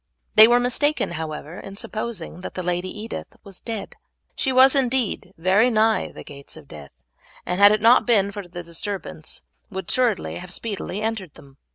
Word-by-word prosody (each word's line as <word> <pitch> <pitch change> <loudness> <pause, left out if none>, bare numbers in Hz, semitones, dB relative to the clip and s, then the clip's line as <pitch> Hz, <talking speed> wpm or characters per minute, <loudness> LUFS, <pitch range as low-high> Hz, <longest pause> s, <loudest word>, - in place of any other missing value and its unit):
They 215 +1 +9
were 240 +1 +5
mistaken, 270 - +1
however, 160 0 -6
in 195 0 -10
supposing 215 -6 -5
that - - -7
the 185 - -3
Lady 180 +1 -1
Edith 215 +4 -7
was 195 -3 -7
dead. 220 -4 -6 0.4
She 265 - +1
was 260 +2 +6
indeed 255 -7 0
very 190 +8 +4
nigh 220 -1 +2
the - - -10
gates 140 +1 -8
of 150 -3 -14
death, 70 -4 -13 0.4
and 180 +2 -2
had 205 0 +9
it 215 0 +1
not 235 +3 +6
been 200 -4 +3
for 200 -2 -7
the 175 0 -8
disturbance 170 -1 -6 0.3
would 190 0 -6
assuredly 240 -7 0
have 180 0 -9
speedily 205 -1 -4
entered 215 -8 -3
them. 140 -2 -17
200 Hz, 180 wpm, -23 LUFS, 175-230 Hz, 0.4 s, They